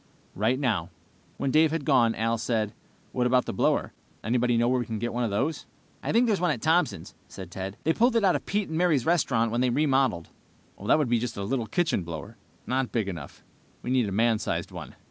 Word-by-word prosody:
"Right 115 +6 +1
now." 105 - 0 0.5
When 135 - -1
Dave 155 +2 +5
had 160 -2 -3
gone, 120 -6 +3
Al 115 +1 0
said, 110 -3 -1 0.4
"What 125 -1 +1
about 125 0 +3
the - - -4
blower? - - +1 0.3
Anybody 120 +1 +1
know 120 +1 +3
where 125 +1 +2
we 120 - -2
can 110 - -3
get 120 +3 -3
one 120 +1 -1
of 115 - 0
those?" 135 +10 -2 0.3
"I - - -2
think 235 +2 +4
there's 210 -6 +1
one 180 - +2
at 140 -6 0
Thompson's," 160 - 0
said 95 -2 -10
Ted. 95 +3 -6
"They 160 - +2
pulled 240 +5 +2
it 230 - +3
out 190 -2 +4
of - - -4
Pete 205 0 0
and 160 +1 -2
Mary's 160 -8 +2
restaurant 125 -9 +2
when 120 +1 0
they 125 - +2
remodeled." 130 - +1 0.5
"That - - +4
would 150 -4 +1
be 120 0 +2
just 120 -1 -4
a 100 - -3
little 115 +2 -2
kitchen 155 - 0
blower. 85 +6 -7 0.3
Not 130 0 -1
big 110 -4 -1
enough 85 -7 -7 0.4
we 125 - -3
need 125 -5 +2
a - - -6
man 110 +2 +2
sized - - -3
one." - - -9
125 Hz, 230 wpm, -27 LUFS, 110-150 Hz, 0.5 s, Dave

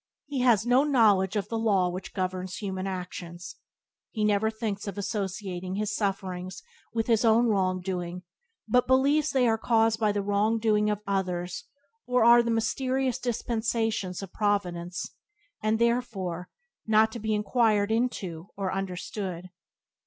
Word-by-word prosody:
He 285 -2 -3
has 235 -4 +4
no 250 +3 +4
knowledge 220 -9 +3
of 205 - -1
the 225 - -2
law 200 -5 +2
which 180 +1 -6
governs 185 -1 -3
human 190 -2 -4
actions, 180 -2 -6 0.6
and 215 -1 +1
never 210 +1 +2
thinks 215 -2 -4
of 200 - -5
associating 190 -2 -3
his 210 +1 -2
sufferings 185 -3 -3 0.3
with 225 -1 -1
his 230 -2 +2
own 230 +1 +5
wrongdoing, 185 -3 -1 0.4
but 250 +3 +3
believes 280 +4 +3
that 275 - -1
they 250 -2 +4
are 225 -1 +2
caused 225 -1 +2
by 215 -2 +2
the 205 -1 -1
wrong 205 +3 +1
doing 210 -1 +2
of 210 0 -2
others 180 -3 -2 0.4
or 250 -1 +3
are 235 0 +8
the 235 - -2
mysterious 255 +3 0
dispensations 225 -5 -1
of 190 - -9
Providence, 180 -4 -1 0.6
and 215 +1 +1
therefore 225 -7 -1 0.4
not 220 0 +4
to 235 - -6
be 220 0 0
inquired 210 -1 +2
into 195 -8 -2
or 195 -2 -2
understood. 185 -1 -5
210 Hz, 150 wpm, -27 LUFS, 185-230 Hz, 0.6 s, are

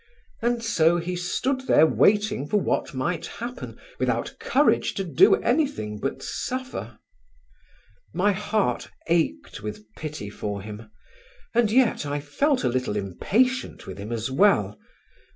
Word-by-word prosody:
And 235 0 0
so 170 -6 +3
he 175 +1 -3
stood 260 +9 -1
there 155 - +6
waiting 205 -2 +2
for 210 - +2
what 170 - -1
might 160 +6 -2
happen 240 +4 -7 0.2
without - - -1
courage - - +2
to 195 - -1
do 160 -8 +5
anything 240 - -1
but 135 +5 -3
suffer. 250 - -4 1.1
My 195 +4 +2
heart 200 - -1 0.2
ached 170 -9 0
with 105 0 -6
pity 150 -10 -6
for 100 -1 -4
him, 105 +1 -9 0.6
and 230 -2 +3
yet 245 -5 +3
I 145 +1 -2
felt 260 - 0
a - - +2
little 125 -4 -1
impatient 225 - 0
with 95 +1 -8
him 105 +3 -6
as 115 +2 -2
well. 130 - +3
170 Hz, 135 wpm, -25 LUFS, -, 1.1 s, there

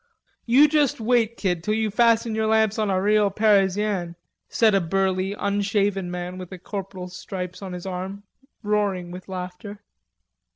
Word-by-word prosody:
"You 265 +6 +6
just 295 -4 +1
wait, 230 0 +1
kid, 180 -4 -1
till 215 +3 0
you 220 -1 0
fasten 230 +1 +3
your 220 0 0
lamps 220 -1 +2
on 215 -2 +1
a 190 -1 +1
real 210 +1 +3
Parizianne," 200 -3 +1 0.3
said 220 -2 +3
a 195 - +3
burly, 190 +2 0
unshaven 200 -2 0
man 180 +1 -5
with 185 0 -9
a 185 - -7
corporal's 185 -1 -7
stripes 180 -1 -6
on 190 -2 -6
his 180 0 -7
arm, 190 +2 -5 0.4
roaring 200 -4 0
with 185 +2 -10
laughter. 185 +3 -7
200 Hz, 160 wpm, -24 LUFS, 185-215 Hz, 0.4 s, You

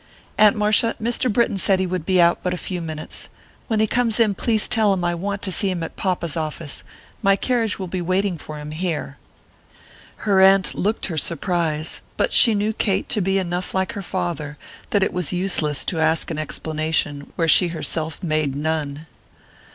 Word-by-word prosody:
"Aunt 210 -1 +5
Marcia, 215 +2 +2
Mr. 240 +2 0
Britton 210 -3 +1
said 190 0 +2
he 190 - +1
would 180 -2 -4
be 185 -1 +3
out 170 0 +4
but 180 0 -1
a - - -6
few 180 0 -4
minutes. 155 -2 -4 0.4
When 220 -3 0
he 220 - +4
comes 230 0 0
in 220 -3 +4
please 220 +2 +1
tell 215 -2 +2
him 185 -2 -2
I 175 0 +1
want 200 +4 -4
to 190 - -1
see 195 +2 +1
him 175 -3 -3
at - - -7
papa's 180 -5 -1
office; 155 -2 -5 0.4
my 195 -2 +4
carriage 230 0 0
will 190 - -4
be 180 0 -4
waiting 185 0 0
for 155 +1 -8
him 150 0 -7
here." 155 -4 -3 1.1
Her 195 -3 +4
aunt 190 0 +5
looked 210 +4 -1
her 165 -4 -1
surprise, 165 -1 0 0.2
but - - +1
she 230 -3 +7
knew 210 +2 0
Kate 195 -3 -1
to 210 - +1
be 195 +1 +1
enough 180 -1 -3
like 190 0 0
her 200 - -6
father 175 -6 -4 0.3
that 200 -2 +2
it - - -1
was 180 -4 +1
useless 175 -6 0
to 165 - -1
ask 160 +1 +2
an 155 - -3
explanation 155 -1 -1
where 165 - 0
she 175 +3 +6
herself 160 -1 -3
made 155 -4 0
none. 150 0 -3
180 Hz, 195 wpm, -21 LUFS, 160-200 Hz, 1.1 s, she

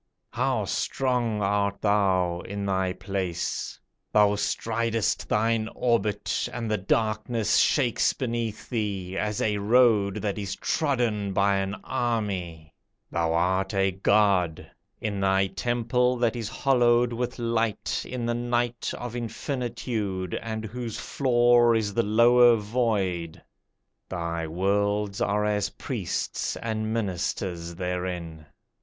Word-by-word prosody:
How - - 0
strong 120 -5 0
art 100 0 0
thou 95 -4 +2
in 100 +1 -5
thy 95 -1 0
place! 95 -2 -3 0.3
Thou 105 -1 +5
stridest 115 +1 -1
thine 110 +1 +1
orbit, 110 -4 0
And 115 -3 -4
the 105 - +1
darkness 110 +3 +1
shakes 125 -6 +3
beneath 115 -4 -3
thee, 100 -6 -3
As 105 +1 -1
a 105 -1 +1
road 105 -2 +4
that 105 0 -1
is 100 -2 -3
trodden 120 -9 0
by 100 +1 +3
an 95 +1 -2
army. 100 - -2 0.4
Thou 85 -1 0
art 95 +4 +1
a 95 0 +2
god, 95 -4 +2 0.3
In 100 -2 -3
thy 95 0 +3
temple 120 +5 0
that 120 0 +1
is 115 -3 -4
hollowed 120 -3 +3
with 125 +1 -3
light 115 -3 -1
In 125 -2 -4
the 120 - 0
night 120 0 -1
of 120 -1 -6
infinitude, 115 -5 -3
And 110 -1 -4
whose 115 0 -5
floor 120 -2 +3
is 105 -2 0
the 115 - +2
lower 120 +2 +6
void; 105 -7 -1 0.7
Thy 85 -2 -3
worlds 100 +3 0
are 105 +1 +1
as 105 -1 0
priests 110 -11 -3
and 110 -1 -3
ministers 90 -5 -2
therein. 90 -3 -4
105 Hz, 120 wpm, -26 LUFS, 95-120 Hz, 0.7 s, lower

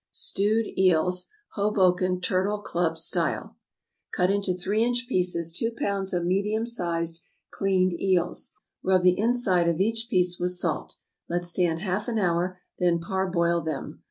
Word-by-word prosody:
=Stewed 215 +3 +2
Eels, 180 0 +3 0.2
Hoboken 185 -3 +1
Turtle 190 +3 0
Club 170 -4 -1
Style.= - - -2 0.6
Cut 180 0 +2
into 200 -1 0
three 205 +5 0
inch 245 +1 0
pieces 180 -6 0
two 225 +7 -1
pounds 195 -1 -1
of 175 -1 -1
medium 205 +5 0
sized 170 -7 -2 0.3
cleaned 185 -2 +1
eels. 180 -2 0 0.3
Rub 185 -1 +2
the 180 0 +4
inside 205 -7 +2
of 170 0 -1
each 225 +3 0
piece 180 -1 +1
with 180 0 0
salt. 175 -3 -2 0.3
Let 175 +1 -1
stand 175 -1 0
half 190 +2 -2
an 235 -2 -1
hour, 180 -1 0 0.2
then 175 -1 +3
parboil 170 -1 0
them. 160 -1 -5
185 Hz, 145 wpm, -26 LUFS, 175-200 Hz, 0.6 s, the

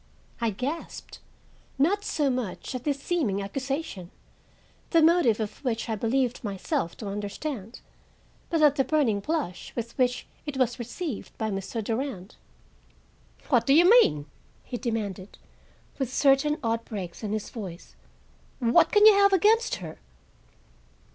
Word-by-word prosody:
I 230 -1 +1
gasped, 265 - -5 0.6
not 375 +9 +2
so 290 -8 0
much 250 -2 -4
at 255 -1 -5
this 285 -2 0
seeming 275 - -1
accusation, 260 - -4 0.8
the 330 - +4
motive 320 -10 +4
of 215 +4 -5
which 240 -3 -1
I 220 - 0
believed 245 +4 0
myself 195 -4 -2
to 215 - -6
understand, 210 +3 -5 0.7
but 325 -2 +1
at 290 -1 +5
the 270 - +4
burning 265 -7 +1
blush 200 - -3
with 235 -1 -5
which 250 -1 +1 0.2
it 285 -2 -4
was 250 -2 +1
received 245 - -6
by 220 -1 -2
Mr. 195 +3 -4
Durand. 225 -3 -4 1.1
"What - - +3
do 275 - +6
you 345 +3 +7
mean?" 370 - +5 0.4
he - - -7
demanded, 210 -6 -4 0.6
with 265 -3 -2
certain 280 +2 +3
odd 230 0 0
breaks 190 -7 -7
in 210 -2 -4
his 215 -1 -3
voice. 190 -7 -8 0.6
"What 235 -2 +4
can 415 -1 +6
you 435 - +10
have 400 0 +5
against 435 +5 +3
her?" - - -9
245 Hz, 140 wpm, -27 LUFS, 210-295 Hz, 1.1 s, you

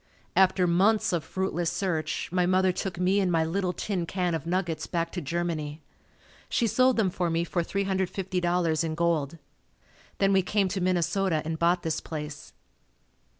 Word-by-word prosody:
After 190 -1 +4
months 190 +5 +3
of 170 -3 0
fruitless 175 -3 -2
search 160 -6 -2
my 180 -1 +2
mother 185 0 +3
took 180 -1 -4
me 185 +2 +3
and 185 -2 +1
my 165 -1 +3
little 180 +2 -1
tin 180 -2 -3
can 180 -2 -1
of 165 0 -3
nuggets 170 -3 -1
back 170 -1 -2
to 180 - -4
Germany. 155 -1 -3 0.7
She 235 - +1
sold 255 +3 +3
them 200 -5 +2
for 175 -1 -1
me 165 +1 +1
for 175 +1 -1
$350.00 180 -3 0
in 160 -1 -2
gold. 165 -2 0 0.8
Then 195 0 +3
we 190 - +5
came 195 +1 +1
to 190 +1 -2
Minnesota 180 -1 +1
and 160 0 -3
bought 175 +1 +2
this 160 -1 -1
place. 150 -2 -7
175 Hz, 165 wpm, -27 LUFS, 165-190 Hz, 0.8 s, we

